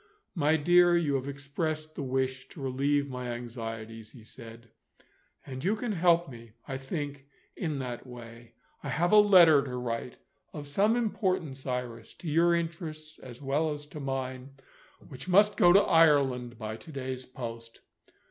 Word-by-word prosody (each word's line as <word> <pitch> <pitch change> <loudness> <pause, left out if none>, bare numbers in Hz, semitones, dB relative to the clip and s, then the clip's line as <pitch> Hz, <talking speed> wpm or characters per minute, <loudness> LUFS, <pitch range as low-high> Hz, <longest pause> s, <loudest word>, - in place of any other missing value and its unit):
"My 155 -3 +2
dear, 175 +2 +5
you 155 -4 0
have 135 0 -1
expressed 155 +3 -4
the - - -6
wish 130 0 -2
to - - -13
relieve 140 +2 0
my 125 -2 -5
anxieties," 115 -2 -7
he 120 -5 -14
said; 115 0 -13 0.7
"and 130 -1 -7
you 200 +4 +2
can 230 +1 -3
help 175 -2 +3
me, 115 -4 -12
I 135 - -4
think, 140 0 -5 0.3
in 155 -5 -3
that 125 -1 -6
way. 120 -1 -12 0.3
I 140 - -6
have 165 +7 +1
a 215 - +7
letter 175 -8 +7
to 130 -2 -5
write 120 0 -4 0.4
of 150 -1 -7
some 205 +10 +2
importance, 185 - -2
Iris, 125 -3 -5
to 175 - -10
your 170 +3 +3
interests 160 -2 -5
as 125 +2 -11
well 150 +4 0
as 145 0 -6
to 150 - -6
mine 135 -1 -5 0.5
which 135 +6 -9
must 205 +3 +5
go 175 -3 +6
to 200 +3 +7
Ireland 140 - +3
by 110 -1 -5
to 160 - -12
day's 130 -2 -5
post. 115 -2 -8
140 Hz, 165 wpm, -29 LUFS, 125-165 Hz, 0.7 s, a